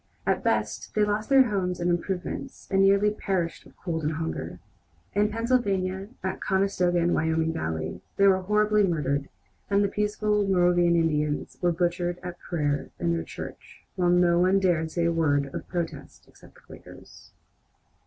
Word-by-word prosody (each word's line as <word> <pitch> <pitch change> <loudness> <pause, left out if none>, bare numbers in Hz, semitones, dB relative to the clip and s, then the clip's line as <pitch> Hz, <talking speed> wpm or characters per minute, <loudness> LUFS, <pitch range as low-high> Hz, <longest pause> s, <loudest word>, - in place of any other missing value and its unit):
At - - 0
best, - - -1
they 210 - +3
lost 210 +2 -2
their 265 -4 +5
homes 180 -3 -1
and 175 - -1
improvements, 180 +8 -3
and 195 0 +3
nearly 200 +2 +4
perished 190 -5 -3
of - - -21
cold 165 -3 -3
and 150 +1 0
hunger. 160 +1 -4 0.6
In 205 +1 +2
Pennsylvania, 200 -5 0 0.2
at 190 0 -3
Conestoga 190 -2 +1
and 170 0 +2
Wyoming 160 0 +1
Valley, 80 - -4 0.2
they 200 - +4
were 190 -1 +5
horribly 210 +2 +2
murdered, 145 -7 0 0.4
and 200 0 +3
the - - +2
peaceful 210 0 0
Moravian 175 -2 +3
Indians 150 -3 0
were 175 -1 +3
butchered 175 +1 -1
at 180 -1 -7
prayer 145 -4 -2
in 170 -1 0
their 165 - -1
church, - - -10
while 180 -2 +1
no 175 -1 +4
one 185 +2 +4
dared 170 -4 +1
say 170 +1 -1
a 170 - +2
word 145 -4 +1
of - - -6
protest 170 -2 -5
except - - -19
the - - -19
Quakers. - - -14
180 Hz, 165 wpm, -26 LUFS, 165-200 Hz, 0.6 s, their